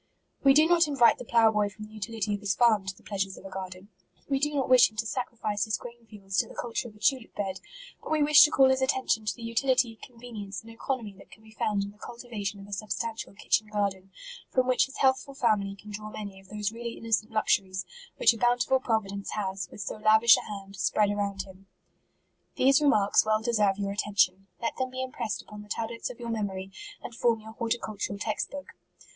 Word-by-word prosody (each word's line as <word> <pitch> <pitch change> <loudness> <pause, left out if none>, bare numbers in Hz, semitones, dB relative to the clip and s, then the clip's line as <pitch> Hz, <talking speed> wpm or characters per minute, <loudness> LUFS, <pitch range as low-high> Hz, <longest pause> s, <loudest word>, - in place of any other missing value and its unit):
" - - -41
We 270 -1 +6
do 305 +1 +7
not 340 -2 +4
invite 270 -5 +4
the 250 - -7
plough 230 -1 +4
boy 210 -1 +1
from 215 +1 -10
the 215 - -16
utility 215 -1 -3
of 205 - -2
his 200 -2 -1
farm, 220 -5 +3
to 190 0 -4
the - - -20
pleasures 195 -2 -3
of - - -13
a 195 - -8
garden; 185 +1 -7 0.4
we 275 -1 +1
do 295 +2 +1
not 270 -2 0
wish 255 -1 +7
him 215 - -22
to 225 - -1
sacrifice 220 -4 -2
his 220 0 -1
grain 235 -1 -12
fields 195 -3 -3
to - - +1
the - - -13
culture 240 +1 -3
of 215 - -14
a - - -18
tulip 260 0 0
bed; 195 -2 -3 0.4
but - - -9
we 310 -1 +3
wish 295 0 +8
to 300 - +8
call 270 -3 +5
his 265 0 +1
attention 260 -4 +1
to - - 0
the 235 - -11
utility, 230 0 +1
convenience, 225 -5 -8
and 230 - -12
economy 230 -2 -4
that - - -16
can 220 - -17
be 220 - -16
found 210 -2 -1
in 200 - -6
the 210 - -23
cultivation 215 -5 -6
of 195 - -10
a 205 - -9
substantial 215 +1 -4
kitchen 215 +2 +1
garden, 200 -2 -2 0.4
from 255 -1 +2
which 255 +1 +3
his 270 - -11
healthful 265 +1 +1
family 210 -6 +1
can 210 +2 -12
draw 215 +1 -6
many 200 -2 -7
of 190 - -19
those 210 0 -2
really 235 +1 -6
innocent 225 -1 0
luxuries, 190 -3 +1 0.3
which - - +5
a 225 - -9
bountiful 245 +2 +3
providence 200 -5 -2
has, 190 -3 -3
with - - -9
so 200 - -4
lav 215 +1 +4
ish 235 - +9
a - - -2
hand, 195 -1 -8
spread 205 +2 +2
around 200 -1 -2
him." 190 0 -16 0.9
These 270 +2 +4
remarks 215 -9 +4
well 215 0 +1
deserve 210 -5 +2
your 200 -1 -2
atten 205 0 -3
tion. 185 +1 +3
Let 230 - -3
them 260 -1 -1
be 260 0 -4
impressed 235 -5 -4
upon 210 0 -11
the 210 - -14
tab 225 +1 -3
lets 230 - -4
of 250 - -10
your 235 -1 -5
memory, 195 -4 -3 0.3
and - - -7
form 230 -1 +1
your 220 +1 -10
horti* 230 +1 -1
cultural 210 -3 -4
text 210 +1 -2
book. 285 -1 -8
215 Hz, 235 wpm, -28 LUFS, 200-240 Hz, 0.9 s, ish